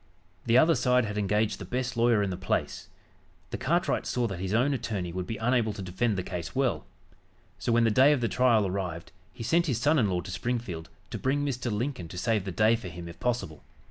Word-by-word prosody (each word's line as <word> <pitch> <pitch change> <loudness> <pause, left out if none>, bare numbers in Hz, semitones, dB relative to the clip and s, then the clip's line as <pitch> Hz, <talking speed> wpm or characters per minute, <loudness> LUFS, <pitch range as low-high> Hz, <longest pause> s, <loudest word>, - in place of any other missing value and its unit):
The 115 +1 +5
other 160 +5 +6
side 125 -4 +2
had 105 -1 -4
engaged 105 +2 0
the - - -6
best 125 +6 -3
lawyer 115 -2 +3
in 100 - -1
the - - -2
place. 95 +1 -2 0.6
The - - -3
cartwright 170 +8 0
saw 125 -1 0
that 95 -6 -4
his 95 0 -3
own 125 +6 +2
attorney 100 -8 -3
would 90 0 -4
be 115 - -4
unable 115 -2 +1
to 100 - -7
defend 95 +4 -1
the 95 - -1
case 85 -3 -6
well. 125 - 0 0.7
So, 120 - -1
when 115 0 +4
the 115 - +3
day 130 +6 +6
of 145 - +2
the 120 - 0
trial 115 -4 +3
arrived 90 -3 -4 0.2
he 95 - -8
sent 170 +8 +2
his 125 -6 0
son 150 +5 +3
in 105 -5 +2
law 90 -1 0
to 95 - -8
Springfield 95 -5 -3 0.2
to - - -4
bring 145 +2 0
Mr. 125 -3 -2
Lincoln 110 -4 -3
to 90 - -9
save 105 +1 0
the 95 - -3
day 110 +6 +4
for 110 -5 -6
him 85 0 -8
if 85 - -11
possible. 120 -11 -2
110 Hz, 235 wpm, -28 LUFS, 95-125 Hz, 0.7 s, other